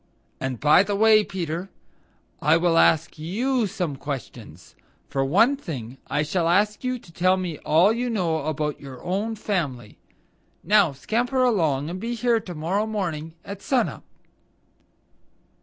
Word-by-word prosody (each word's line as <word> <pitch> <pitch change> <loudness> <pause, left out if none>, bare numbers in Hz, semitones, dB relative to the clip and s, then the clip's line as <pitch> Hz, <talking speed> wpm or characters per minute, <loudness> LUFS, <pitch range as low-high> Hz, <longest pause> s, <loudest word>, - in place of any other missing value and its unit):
And, 130 -3 -3
by 150 +4 +6
the 200 +1 -1
way, 215 +1 +5
Peter, 175 -1 -4 0.7
I 155 +3 +4
will 170 0 +2
ask 160 0 +3
YOU 230 +9 0
some 180 -7 -3
questions. 140 -3 -8 0.4
For 135 - 0
one 205 - +4
thing 135 - -7
I 145 +1 0
shall 165 +2 0
ask 210 +6 +2
you 255 0 -1
to 190 -8 -17
tell 185 +3 +2
me 175 -5 -4
all 175 +8 +4
you 245 +2 -2
know 165 -9 -1
about 150 -1 -2
your 135 -3 -10
own 205 +5 -2
family. 145 - -3 0.6
Now 200 -3 +4
scamper 245 - 0
along 160 - +1
and 180 +3 -5
be 235 +3 -3
here 235 0 +2
to 185 -5 -8
morrow 185 +8 -1
morning 165 -7 -4
at 200 0 -7
sun 260 -3 +1
up." - - -11
180 Hz, 155 wpm, -24 LUFS, 155-215 Hz, 0.7 s, by